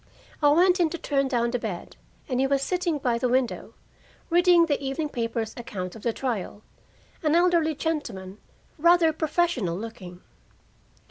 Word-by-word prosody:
I 290 Hz, -, +5 dB
went 360 Hz, +5 st, +4 dB
in 340 Hz, -2 st, +3 dB
to 340 Hz, -, -5 dB
turn 275 Hz, -3 st, 0 dB
down 235 Hz, -2 st, 0 dB
the 245 Hz, -, -1 dB
bed, 205 Hz, -7 st, -6 dB, 0.3 s
and 255 Hz, -2 st, -1 dB
he 270 Hz, -, +3 dB
was 275 Hz, 0 st, +1 dB
sitting 355 Hz, -2 st, -1 dB
by 245 Hz, -4 st, 0 dB
the 250 Hz, -, 0 dB
window, 250 Hz, -1 st, -1 dB, 0.6 s
reading 350 Hz, 0 st, +5 dB
the 290 Hz, -3 st, -1 dB
evening 275 Hz, +3 st, -2 dB
paper's 230 Hz, -3 st, -3 dB
account 185 Hz, -6 st, -6 dB
of 225 Hz, -, -10 dB
the 235 Hz, -, 0 dB
trial 220 Hz, -4 st, -4 dB, 0.6 s
an 310 Hz, 0 st, +2 dB
elderly 340 Hz, -3 st, +3 dB
gentleman, 225 Hz, -, -4 dB, 0.4 s
rather 340 Hz, 0 st, +5 dB
professional 310 Hz, -, 0 dB
looking. 190 Hz, -5 st, -9 dB
270 Hz, 155 wpm, -25 LUFS, 230-325 Hz, 0.6 s, I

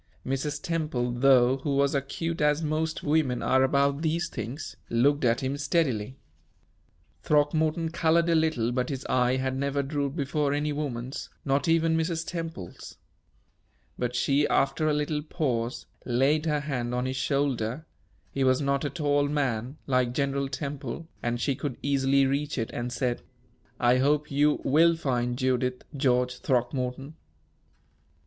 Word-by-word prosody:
Mrs. 140 Hz, +2 st, -2 dB
Temple, 150 Hz, -8 st, -1 dB
though, 125 Hz, 0 st, +4 dB
who 140 Hz, +1 st, -2 dB
was 140 Hz, 0 st, +2 dB
acute 155 Hz, +4 st, -2 dB
as 150 Hz, +2 st, +2 dB
most 155 Hz, +1 st, -1 dB
women 145 Hz, -4 st, +1 dB
are 130 Hz, 0 st, +3 dB
about 140 Hz, +2 st, +2 dB
these 165 Hz, +1 st, 0 dB
things, 120 Hz, +8 st, -6 dB
looked 140 Hz, +5 st, +2 dB
at 115 Hz, -1 st, +2 dB
him 135 Hz, +2 st, -1 dB
steadily. 140 Hz, -6 st, 0 dB, 1.0 s
Throckmorton 155 Hz, +2 st, +1 dB
colored 170 Hz, 0 st, +2 dB
a 170 Hz, -, +3 dB
little, 155 Hz, -8 st, +1 dB
but 125 Hz, 0 st, -1 dB
his 135 Hz, -2 st, -4 dB
eye 125 Hz, 0 st, +2 dB
had 130 Hz, 0 st, -1 dB
never 140 Hz, +1 st, -1 dB
drooped 140 Hz, 0 st, -2 dB
before 145 Hz, -1 st, 0 dB
any 150 Hz, 0 st, -1 dB
woman's, 135 Hz, -3 st, -4 dB, 0.2 s
not 140 Hz, +3 st, +1 dB
even 165 Hz, 0 st, +3 dB
Mrs. 165 Hz, 0 st, -1 dB
Temple's. 165 Hz, -, -7 dB, 1.0 s
But 125 Hz, 0 st, -2 dB
she, 140 Hz, +3 st, +2 dB
after 155 Hz, +3 st, +1 dB
a -, -, +2 dB
little 150 Hz, 0 st, -1 dB
pause, 130 Hz, -7 st, -2 dB, 0.2 s
laid 140 Hz, +6 st, +2 dB
her 150 Hz, -1 st, +1 dB
hand 125 Hz, -4 st, -3 dB
on 125 Hz, +1 st, -1 dB
his 130 Hz, 0 st, -2 dB
shoulder 130 Hz, 0 st, -1 dB, 0.5 s
he 135 Hz, -, -1 dB
was 130 Hz, 0 st, +3 dB
not 140 Hz, -1 st, 0 dB
a 145 Hz, -, -1 dB
tall 145 Hz, -3 st, +1 dB
man, 135 Hz, -2 st, -1 dB
like 125 Hz, -2 st, +1 dB
General 140 Hz, 0 st, -1 dB
Temple, 145 Hz, +2 st, -5 dB
and 120 Hz, 0 st, -1 dB
she 140 Hz, -, +1 dB
could 140 Hz, -1 st, -4 dB
easily 140 Hz, -1 st, +3 dB
reach 140 Hz, +2 st, -1 dB
it 115 Hz, -2 st, -2 dB
and 120 Hz, +1 st, -3 dB
said: 120 Hz, 0 st, -1 dB, 0.6 s
"I 125 Hz, +1 st, +4 dB
hope 145 Hz, +2 st, +1 dB
you 145 Hz, +2 st, +2 dB
will 165 Hz, +5 st, +4 dB
find 125 Hz, -5 st, -1 dB
Judith, 125 Hz, -1 st, 0 dB
George 125 Hz, -2 st, +1 dB
Throckmorton." 125 Hz, +2 st, -1 dB
140 Hz, 150 wpm, -27 LUFS, 125-150 Hz, 1.0 s, though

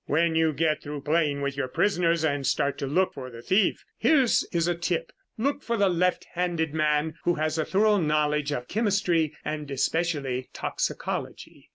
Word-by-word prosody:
"When 165 Hz, +2 st, +2 dB
you 160 Hz, 0 st, +3 dB
get 155 Hz, +1 st, 0 dB
through 145 Hz, -1 st, -6 dB
playing 150 Hz, -2 st, +1 dB
with 140 Hz, 0 st, -2 dB
your 140 Hz, -2 st, -2 dB
prisoners 170 Hz, +1 st, +1 dB
and 145 Hz, -3 st, 0 dB
start 140 Hz, 0 st, 0 dB
to 140 Hz, -, -2 dB
look 180 Hz, +7 st, +1 dB
for 130 Hz, -2 st, -7 dB
the 115 Hz, -1 st, -11 dB
thief, 195 Hz, +2 st, +2 dB
here 305 Hz, -4 st, +4 dB
is 170 Hz, -7 st, +1 dB
a 175 Hz, -, +2 dB
tip. 170 Hz, -1 st, -2 dB, 0.3 s
Look 280 Hz, +5 st, -1 dB
for 235 Hz, -, -2 dB
a 200 Hz, -3 st, +3 dB
left 180 Hz, 0 st, +1 dB
handed 170 Hz, -3 st, -1 dB
man 155 Hz, 0 st, +1 dB
who 175 Hz, -, +2 dB
has 155 Hz, +1 st, -1 dB
a 155 Hz, -, +1 dB
thorough 210 Hz, +2 st, +3 dB
knowledge 150 Hz, -2 st, +1 dB
of 125 Hz, -4 st, -3 dB
chemistry 190 Hz, -8 st, +1 dB
and 150 Hz, -1 st, -4 dB
especially 140 Hz, -2 st, -1 dB
toxicology." -, -, -4 dB
160 Hz, 180 wpm, -26 LUFS, 145-180 Hz, 0.3 s, here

